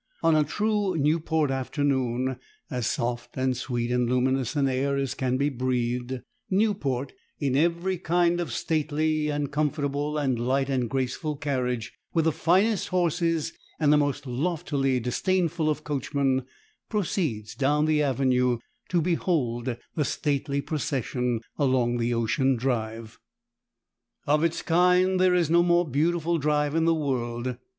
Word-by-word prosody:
On 165 - +5
a 155 - +4
true 205 +3 0
Newport 155 0 +1
afternoon, 130 -2 -1 0.3
as 125 -3 -1
soft 120 0 -3
and 130 0 +1
sweet 120 -1 -2
and 125 -1 +1
luminous 130 +2 +1
an 140 -2 +2
air 135 +2 0
as 135 -2 -1
can 130 -1 -1
be 140 +2 +1
breathed, 125 -1 -2 0.3
Newport, 185 - 0 0.3
in 135 -3 0
every 170 +4 +1
kind 175 0 +2
of 175 - -3
stately 155 0 0
and 145 -1 -2
comfortable 145 0 -1
and 135 -5 0
light 135 +3 0
and 125 -3 0
graceful 135 +4 -2
carriage, 125 -5 -2 0.2
with 165 -1 +3
the 160 - +4
finest 190 +7 +2
horses 170 -3 0 0.3
and 150 -2 +4
the - - +5
most 145 -1 0
loftily 135 -1 0
disdainful 165 +5 0
of 150 0 -2
coachmen, 135 -2 -1 0.4
proceeds 160 - -1
down 145 +2 +2
the 155 -1 +2
avenue 125 -3 +2 0.3
to 175 -2 +2
behold 130 -9 0 0.2
the 150 - 0
stately 140 -1 -1
procession 130 -6 -2 0.2
along 130 -4 +2
the 120 0 0
ocean 125 +3 +1
drive. 115 -2 -3 1.1
Of 150 +2 +2
its 165 0 0
kind 180 +2 +3
there 185 -1 +4
is 170 -3 +2
no 170 0 +6
more 175 0 +3
beautiful 165 +4 +1
drive 150 0 +1
in 165 0 +2
the 165 0 +4
world. 125 -4 -2
145 Hz, 145 wpm, -26 LUFS, 125-160 Hz, 1.1 s, no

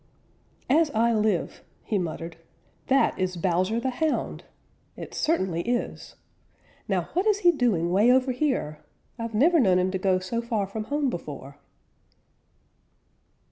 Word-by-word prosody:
"As 310 +3 +3
I 230 +1 +3
live," 210 -5 0 0.2
he 210 - -1
muttered, 165 -1 -5 0.5
"that 270 -5 +2
is 185 -1 -1
Bowser 185 +5 +1
the 260 +2 -1
Hound! 310 +4 -2 0.5
It - - -8
certainly 190 - 0
is. 240 +4 -3 0.7
Now - - -1
what 370 +4 +1
is 415 -1 +2
he 350 - +6
doing 215 - +1
way 210 +6 +5
over 260 0 +3
here? 250 - -1 0.4
I've 230 -1 -4
never 325 +9 +4
known 190 -8 +4
him 185 +1 +1
to 190 - -2
go 185 -1 +2
so 185 +6 -3
far 230 -4 -1
from 215 +2 -5
home 285 +1 0
before." 145 - -8
220 Hz, 140 wpm, -26 LUFS, 185-260 Hz, 0.7 s, he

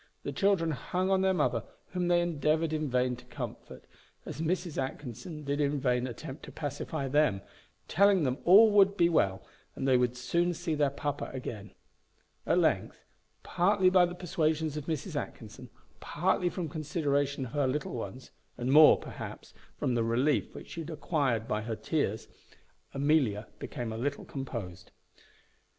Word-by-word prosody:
The - - -3
children 195 -5 +2
hung 180 +7 -2
on 190 -1 +3
their 190 0 +3
mother, 175 -6 +1 0.3
whom 180 -1 -2
they 175 0 +4
endeavoured 160 -1 0
in 155 -2 -1
vain 125 0 +1
to - - -15
comfort, - - -8 0.4
as - - -6
Mrs. 170 -2 -1
Atkinson 135 +3 -6
did 140 +1 -1
in 145 0 +1
vain 125 -1 +1
attempt 135 +3 -8
to - - -10
pacify 145 -1 -4
them, 145 -8 +2 0.5
telling 200 -1 +4
them 130 0 -1
all 210 +5 +8
would 200 -1 +5
be 170 -2 +4
well, 95 - +1 0.3
and 135 - -2
they 130 -1 +5
would 125 0 0
soon 170 +8 0
see 170 -1 -2
their 145 -2 +2
papa 145 +1 -4
again. 110 -5 -7 0.7
At - - +3
length, - - 0 0.4
partly 185 +1 +3
by 180 -1 +5
the 175 - -7
persuasions 160 -3 -1
of 150 -2 -5
Mrs. 160 -4 -3
Atkinson, - - -6 0.3
partly 180 +2 0
from 175 -2 -4
consideration 145 -3 -1
of 115 - -9
her 145 -1 +1
little 140 +3 -2
ones, 125 +2 -7 0.3
and 125 +2 -1
more, 155 +2 +8
perhaps, - - -9 0.2
from 125 - 0
the 115 -1 +1
relief 125 +6 +1
which - - -10
she 165 - -5
had 160 - -7
acquired 140 -8 -1
by 105 - -1
her 110 +1 -4
tears, 110 -6 -2 0.7
Amelia 135 -7 +1
became 120 -6 -5
a 110 - -5
little 145 +3 -2
composed. 110 -10 -6
145 Hz, 165 wpm, -30 LUFS, 130-170 Hz, 0.7 s, all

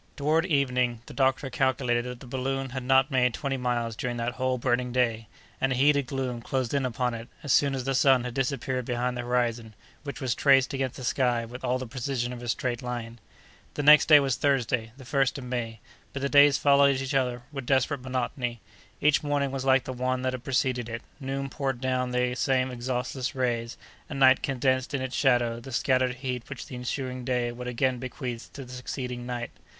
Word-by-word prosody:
Toward 155 +4 +2
evening, 125 -6 +1
the - - -11
doctor 135 0 +1
calculated 125 -2 +1
that 125 -1 -7
the - - -10
balloon 135 +1 -3
had 130 0 -4
not 130 +2 +3
made 125 -3 +2
twenty 140 -1 -2
miles 120 -3 -1
during 120 +1 -3
that 120 +1 -1
whole 130 0 -1
burning 125 0 0
day, 115 -3 0 0.3
and 135 - +2
a - - +1
heated 140 +1 +3
gloom 125 -2 -3
closed 130 +1 -2
in 135 -2 +1
upon 125 0 -1
it, 115 0 -7 0.2
as 145 - +1
soon 140 -1 +3
as 130 - -3
the 135 +1 -1
sun 130 -1 +4
had 125 -1 -5
disappeared 130 0 -1
behind 125 +1 -1
the 120 - -3
horizon, 120 -2 -1 0.3
which 140 -2 -7
was 130 -3 0
traced 135 -1 +4
against 135 -2 -2
the 130 - -7
sky 120 -1 +1
with 125 +3 -10
all 125 0 +1
the 130 - -5
precision 125 0 -3
of 120 - -8
a 120 - -7
straight 120 0 -1
line. 120 -2 -5 0.6
The 145 - -2
next 150 +1 +8
day 150 -2 +9
was 135 -3 0
Thursday, 125 -5 0
the 135 - -11
1st 135 +1 +1
of 135 - -7
May, 120 -3 -4 0.3
but 140 - -4
the 140 - +1
days 145 -1 +6
followed 140 -1 +4
each 135 +1 -3
other 125 -3 0
with 135 -4 -6
desperate 135 0 +1
monotony. 125 -1 -3 0.4
Each 150 0 +4
morning 145 -2 0
was 135 -1 -4
like 130 -1 +4
the 130 - -5
one 130 +1 -1
that 130 0 0
had 125 -1 -6
preceded 130 -3 0
it; 115 0 -5 0.2
noon 135 0 -3
poured 135 -2 -3
down 130 -1 0
the 125 0 0
same 130 0 +1
exhaustless 125 +2 -3
rays, 120 -2 -1 0.3
and 140 - -5
night 130 -1 +6
condensed 130 0 0
in 135 - -2
its 130 0 -4
shadow 120 -4 +2
the 130 +3 -10
scattered 130 0 +1
heat 125 -2 -5
which 140 -3 -7
the 130 - -9
ensuing 125 0 -4
day 120 -1 0
would 125 +1 -7
again 125 +1 0
bequeath 125 -1 -6
to 135 - -8
the 125 - -11
succeeding 125 -1 -5
night. 120 -2 -4
130 Hz, 210 wpm, -27 LUFS, 120-135 Hz, 0.6 s, day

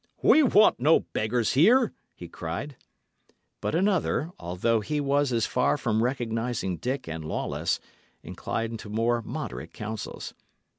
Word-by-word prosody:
"We 315 - +7
want 215 - +5
no 150 +6 +5
beggars 110 +1 -1
here!" 230 - +5 0.2
he 85 - -9
cried. 85 - -5 0.9
But - - -1
another 180 -3 +1
although 90 +7 0
he 150 +8 -2
was 140 -1 +1
as 115 -2 +1
far 125 +3 +1
from 110 -5 0
recognising 115 -6 -1
Dick 130 +2 -3
and 80 -1 -5
Lawless 75 - -2 0.4
inclined 115 0 -4
to 110 - -9
more 115 +2 +1
moderate 130 +3 -6
counsels. 110 0 -6
120 Hz, 135 wpm, -27 LUFS, 110-145 Hz, 0.9 s, We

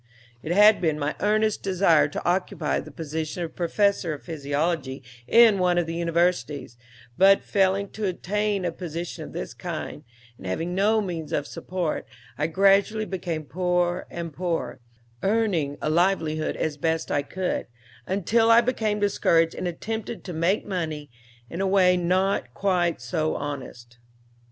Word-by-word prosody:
"'It 155 - -5
had 210 +4 +6
been 160 -3 +1
my 150 0 -2
earnest 215 +1 +1
desire 175 -6 +3
to 145 - -6
occupy 175 -3 0
the - - -9
position 160 +2 -4
of 165 - -7
professor 185 -1 +1
of 145 - -14
physiology 145 -3 -2 0.2
in 225 -4 +6
one 180 -1 +2
of 175 - +2
the 165 - -4
universities, 170 -6 0 0.4
but 195 +1 +6
failing 195 0 +1
to 210 +1 -4
obtain 200 +2 -1
a 175 - 0
position 170 0 -6
of - - -9
this - - -5
kind, - - -6 0.4
and 95 - -8
having 165 - -2
no 210 +4 +3
means 165 -6 -5
of 145 -3 -1
support, 180 -4 -4 0.3
I 150 +5 0
gradually 195 +5 +3
became 175 -5 -4
poorer 180 +1 0
and 170 -2 -6
poorer, 175 +1 -3 0.4
earning 190 -9 0
a - - +1
livelihood 160 -3 +1
as 155 -2 -2
best 160 +2 -1
I 145 - +2
could, 180 +6 -3 0.4
until 215 +4 +2
I 230 +1 +7
became 220 -4 -1
discouraged 165 -5 +2
and 180 - -4
attempted 220 +6 -5
to 180 - -6
make 170 +6 +1
money 155 - -4 0.4
in 170 +9 -5
a 195 - +1
way 185 -2 +4
not 180 -7 0
quite 180 -4 +1
so 155 -3 -1
honest. 125 -4 -7
175 Hz, 155 wpm, -25 LUFS, 155-195 Hz, 0.4 s, I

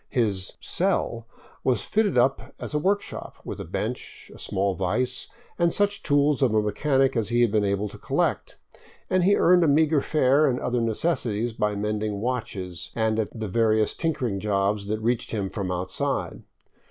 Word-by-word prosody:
His 105 -8 0
" - - -49
cell 115 -1 -1 0.2
" - - -27
was 125 -3 +1
fitted 210 -8 +1
up 130 +3 +1
as - - -5
a 150 - +1
work 200 +5 +1
shop, - - -8
with - - -6
a - - -4
bench, - - -5
a - - -14
small 95 +1 -1
vise, 125 +8 -1 0.3
and 170 0 +3
such 205 +2 +1
tools 145 -1 +2
of 120 -5 +3
a 110 - +4
mechanic 135 +5 +1
as 110 -3 0
he 120 0 +2
had 120 -3 +3
been 105 -1 +2
able 100 +1 0
to - - -12
collect, - - -1 0.5
and 185 -1 +3
he 200 +2 +5
earned 180 0 +5
a - - +3
meager 150 0 +3
fare 145 0 +3
and 125 -2 0
other 125 -1 -1
necessities 115 -2 -1
by 105 -2 -1
mending 105 0 -2
watches 95 -7 -4
and 110 -1 +1
at 110 +1 -3
the 110 - -3
various 110 +1 +2
tinkering 130 -11 -1
jobs 100 0 0
that 110 +1 -1
reached 120 +1 0
him 100 -4 -3
from 95 -4 -3
outside. 90 +1 -2
115 Hz, 190 wpm, -25 LUFS, 105-140 Hz, 0.5 s, he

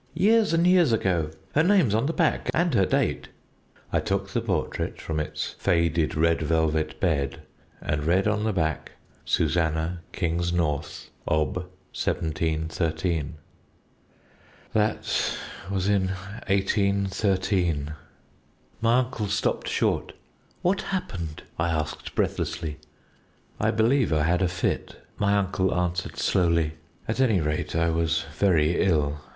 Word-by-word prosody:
"'Years 215 +5 +4
and 165 +1 +3
years 180 -6 +5
ago! 90 -8 +1 0.2
Her 155 - +4
name's 175 - +4
on 115 +5 +2
the - - +1
back 165 -1 +1
and 175 0 +2
her 95 - +3
date - - 0 0.3
' - - -29
"I - - +3
took 100 0 -1
the 115 - -1
portrait 95 -9 -2
from 80 -1 -3
its 75 - -3
faded 85 -3 +1
red 85 +1 +2
velvet 80 0 0
bed, 70 -6 0 0.4
and 75 -1 -1
read 90 +6 +2
on 105 0 +1
the 110 - +1
back 80 -5 -2 0.3
'SUSANNAH 80 +1 +1
KINGSNORTH, 85 -3 -1 0.2
Ob. 75 -3 +1
1713.' 80 -2 -2 1.4
"That 105 0 +1 0.4
was 95 -1 0
in 100 -2 +2 0.4
1813." 95 -5 +1 0.9
My 115 +1 +4
uncle 125 -4 -1
stopped 100 - -1
short. - - 0 0.5
"What 185 +2 +2
happened?" 85 - -4 0.2
I 85 +1 +1
asked 80 -2 -3
breathlessly. 80 -2 -2 0.8
"I - - +2
believe 115 +2 +2
I 75 -1 +2
had 85 +3 +2
a 95 - +3
fit," 90 +1 -2 0.2
my 100 0 +3
uncle 95 -1 +1
answered 90 +1 -2
slowly; 85 -3 +2 0.4
"at 110 - -2
any 110 -8 +4
rate, 75 0 -2
I 85 0 +2
was 80 0 0
very 85 -4 +3
ill." 75 -6 +1
90 Hz, 125 wpm, -26 LUFS, 80-105 Hz, 1.4 s, years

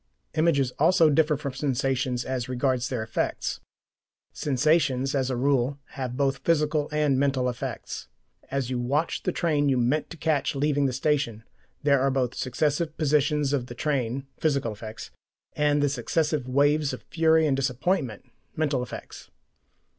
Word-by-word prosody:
Images 150 -5 +2
also 165 0 +5
differ 150 0 +3
from 140 -2 -5
sensations 130 -2 -1
as 130 -1 -3
regards 130 0 0
their 120 -4 -2
effects. 110 - -2 0.7
Sensations, 135 -1 +1
as 135 -2 0
a 130 - -1
rule, 135 +1 +1
have 125 -2 -5
both 135 -1 +1
physical 150 -2 +1
and 150 -3 +2
mental 135 -2 +1
effects. 125 -1 -5 0.4
As 135 -2 -2
you 125 - -1
watch 140 +7 0
the 185 - -1
train 150 -5 +1
you 130 - +2
meant 125 +5 +1
to 170 - -9
catch 150 -3 0
leaving 145 0 +2
the - - -1
station, 130 -4 0 0.4
there 140 -2 +4
are 135 - +3
both 130 -2 0
the - - -13
successive 150 +5 -1
positions 150 -1 +2
of 125 -4 -1
the 120 - -8
train 135 -2 -1
(physical 140 -7 +1
effects) 110 0 -8 0.4
and 145 -1 +2
the - - +4
successive 145 +1 -1
waves 145 +1 +2
of 130 - -7
fury 160 -1 +3
and 140 -3 +2
disappointment 135 - -1 0.3
(mental 145 -4 0
effects). 125 - -8
140 Hz, 155 wpm, -26 LUFS, 130-150 Hz, 0.7 s, also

